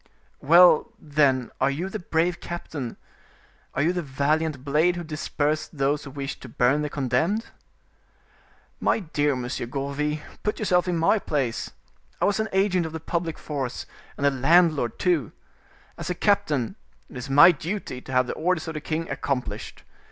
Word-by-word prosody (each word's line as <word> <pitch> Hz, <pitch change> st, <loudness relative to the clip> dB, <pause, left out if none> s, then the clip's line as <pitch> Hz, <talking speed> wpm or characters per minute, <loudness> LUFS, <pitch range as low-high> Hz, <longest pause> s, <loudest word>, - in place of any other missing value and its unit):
"Well, 170 Hz, +2 st, +6 dB
then, 145 Hz, -4 st, +1 dB
are 135 Hz, -, +4 dB
you 155 Hz, +7 st, -2 dB
the 215 Hz, +3 st, -5 dB
brave 175 Hz, 0 st, 0 dB
captain, 150 Hz, -7 st, -6 dB, 0.8 s
are 140 Hz, -, +1 dB
you 170 Hz, +3 st, +2 dB
the 180 Hz, -, -1 dB
valiant 145 Hz, 0 st, -1 dB
blade 155 Hz, +5 st, +3 dB
who 175 Hz, -, -4 dB
dispersed 155 Hz, 0 st, -2 dB
those 140 Hz, +2 st, +1 dB
who -, -, -7 dB
wished 140 Hz, 0 st, -6 dB
to 130 Hz, -, -9 dB
burn 125 Hz, +6 st, +2 dB
the 150 Hz, -, -2 dB
condemned?" 145 Hz, -, 0 dB, 1.3 s
"My -, -, +1 dB
dear 150 Hz, -5 st, 0 dB
Monsieur 125 Hz, -1 st, -4 dB
Gourville, 140 Hz, +3 st, -2 dB, 0.2 s
put 210 Hz, -, -1 dB
yourself 185 Hz, -4 st, +2 dB
in 175 Hz, -1 st, 0 dB
my 165 Hz, +7 st, +3 dB
place. 135 Hz, -10 st, -2 dB, 0.5 s
I -, -, +2 dB
was 205 Hz, +1 st, +1 dB
an 220 Hz, -1 st, -1 dB
agent 190 Hz, -3 st, +2 dB
of 160 Hz, -, -9 dB
the 160 Hz, -, -4 dB
public 165 Hz, 0 st, -3 dB
force 135 Hz, -5 st, -4 dB, 0.3 s
and 140 Hz, -, -1 dB
a 140 Hz, -, +5 dB
landlord, 145 Hz, -2 st, +3 dB
too. 170 Hz, -, +1 dB, 0.7 s
As -, -, -5 dB
a 180 Hz, -, -1 dB
captain, 195 Hz, -, +1 dB, 0.3 s
it -, -, -15 dB
is 125 Hz, +2 st, -6 dB
my 145 Hz, +6 st, +8 dB
duty 170 Hz, -4 st, -5 dB
to 130 Hz, -, -10 dB
have 130 Hz, 0 st, +3 dB
the -, -, -4 dB
orders 170 Hz, 0 st, -1 dB
of 160 Hz, -, -4 dB
the 155 Hz, -, -5 dB
king 160 Hz, +2 st, -3 dB
accomplished. 135 Hz, -3 st, -4 dB
150 Hz, 170 wpm, -25 LUFS, 135-175 Hz, 1.3 s, my